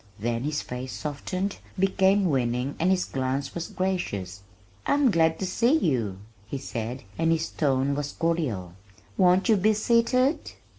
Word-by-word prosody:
Then 115 Hz, +3 st, -2 dB
his 150 Hz, 0 st, -1 dB
face 125 Hz, +1 st, -6 dB
softened, 185 Hz, +7 st, -3 dB, 0.2 s
became 195 Hz, +1 st, +3 dB
winning 125 Hz, -2 st, 0 dB
and 175 Hz, -, +2 dB
his 190 Hz, -1 st, +2 dB
glance 130 Hz, +1 st, -2 dB
was 170 Hz, -1 st, -4 dB
gracious. 100 Hz, -, -3 dB, 0.5 s
"I'm 285 Hz, -4 st, +4 dB
glad 160 Hz, -2 st, +3 dB
to 190 Hz, -, -3 dB
see 235 Hz, +10 st, +3 dB
you," 120 Hz, -, 0 dB, 0.3 s
he 140 Hz, -, -4 dB
said, 125 Hz, -1 st, -5 dB, 0.2 s
and 165 Hz, 0 st, +3 dB
his 165 Hz, 0 st, 0 dB
tone 135 Hz, -2 st, +1 dB
was 145 Hz, 0 st, -3 dB
cordial. 135 Hz, -, -1 dB, 0.4 s
"Won't 185 Hz, +2 st, +4 dB
you 220 Hz, -3 st, +5 dB
be 215 Hz, +3 st, +3 dB
seated?" 240 Hz, +6 st, +2 dB
160 Hz, 150 wpm, -26 LUFS, 130-190 Hz, 0.5 s, you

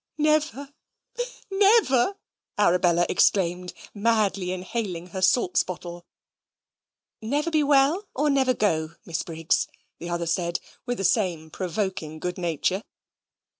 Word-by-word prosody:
"Never, 300 Hz, -2 st, +1 dB, 0.8 s
never," 390 Hz, -, +4 dB, 0.4 s
Arabella 175 Hz, -3 st, +3 dB
exclaimed, 180 Hz, -1 st, +2 dB, 0.2 s
madly 205 Hz, -4 st, +1 dB
inhaling 185 Hz, -2 st, -4 dB
her 190 Hz, +1 st, -5 dB
salts 185 Hz, 0 st, +3 dB
bottle. 175 Hz, -1 st, -7 dB, 1.1 s
"Never 290 Hz, +9 st, -1 dB
be 310 Hz, -1 st, +3 dB
well 290 Hz, +7 st, +3 dB
or 295 Hz, +2 st, +2 dB
never 265 Hz, -2 st, +2 dB
go, 160 Hz, -7 st, 0 dB
Miss 170 Hz, -1 st, -2 dB
Briggs?" 165 Hz, -1 st, 0 dB, 0.3 s
the 170 Hz, -, -6 dB
other 170 Hz, 0 st, -2 dB
said, 170 Hz, +1 st, -1 dB, 0.3 s
with 245 Hz, 0 st, -1 dB
the 195 Hz, -, -3 dB
same 175 Hz, -7 st, 0 dB
provoking 185 Hz, -4 st, -3 dB
good 180 Hz, +3 st, -4 dB
nature. 175 Hz, +3 st, 0 dB
190 Hz, 115 wpm, -25 LUFS, 175-265 Hz, 1.1 s, never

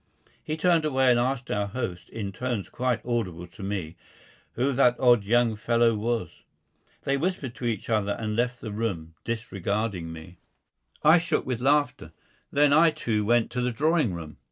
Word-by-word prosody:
He 155 Hz, -, -3 dB
turned 170 Hz, -1 st, +3 dB
away 135 Hz, -4 st, +3 dB
and 120 Hz, -, +4 dB
asked 125 Hz, 0 st, -1 dB
our 105 Hz, 0 st, 0 dB
host, 100 Hz, -5 st, -5 dB
in 105 Hz, -3 st, -5 dB
tones 120 Hz, 0 st, -3 dB
quite 125 Hz, -1 st, -1 dB
audible 95 Hz, -8 st, -2 dB
to 90 Hz, +3 st, -14 dB
me, 95 Hz, -4 st, -4 dB, 0.6 s
who 135 Hz, +3 st, 0 dB
that 125 Hz, -2 st, +3 dB
odd 120 Hz, -4 st, +5 dB
young 115 Hz, +1 st, +2 dB
fellow 115 Hz, +2 st, +2 dB
was. 110 Hz, -5 st, -3 dB, 0.6 s
They 140 Hz, 0 st, +1 dB
whispered 150 Hz, -5 st, -2 dB
to 120 Hz, -, -7 dB
each 115 Hz, -2 st, -2 dB
other 105 Hz, -3 st, +1 dB
and 110 Hz, +1 st, -3 dB
left 120 Hz, +1 st, -1 dB
the 110 Hz, -, -5 dB
room, 95 Hz, -7 st, -3 dB
disregarding 105 Hz, -5 st, -3 dB
me. 80 Hz, +2 st, -11 dB, 0.6 s
I 160 Hz, +3 st, +7 dB
shook 165 Hz, -, -1 dB
with 125 Hz, -2 st, -3 dB
laughter. 145 Hz, +2 st, +1 dB, 0.4 s
Then 145 Hz, 0 st, +4 dB
I, 165 Hz, +2 st, +6 dB
too, 110 Hz, -8 st, -1 dB
went 115 Hz, +2 st, +2 dB
to 125 Hz, +1 st, -2 dB
the 125 Hz, -, +1 dB
drawing 150 Hz, -, +1 dB
room. 80 Hz, -2 st, -8 dB
115 Hz, 175 wpm, -26 LUFS, 100-130 Hz, 0.6 s, I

